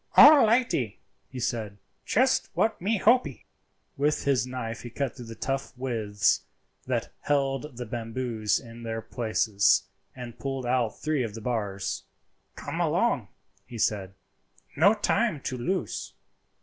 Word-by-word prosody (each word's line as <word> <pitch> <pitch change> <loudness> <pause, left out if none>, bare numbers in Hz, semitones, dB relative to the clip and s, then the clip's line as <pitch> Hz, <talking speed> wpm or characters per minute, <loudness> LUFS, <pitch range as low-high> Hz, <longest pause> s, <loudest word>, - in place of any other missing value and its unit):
"All 290 -5 +10
lightee," 215 - +1 0.3
he 130 - -7
said; 110 -4 -2 0.3
"just 260 +4 +2
what 220 -4 +1
me 210 +4 +1
hopee." 240 +6 +2 0.5
With 145 +2 +1
his 130 -3 +2
knife 125 -2 -5
he 120 - -7
cut 135 +2 -3
the 115 -3 -9
tough 135 +3 -3
withes 110 -6 +1 0.5
that - - -2
held 140 -1 -1
the 125 - -4
bamboos 115 -2 -1
in 115 0 -12
their 115 -1 -4
places, 110 -3 +2 0.3
and 120 -2 -9
pulled 135 -2 -3
out 120 -2 0
three 155 -2 0
of 115 -3 -3
the 115 - -7
bars. 105 -5 -2 0.5
"Come - - -5
along," - - +1 0.4
he 120 - -8
said; 95 -3 0 0.6
"no 205 +2 +5
time 215 -4 +1
to 130 - -3
lose." 175 +9 -3
125 Hz, 135 wpm, -27 LUFS, 115-145 Hz, 0.6 s, All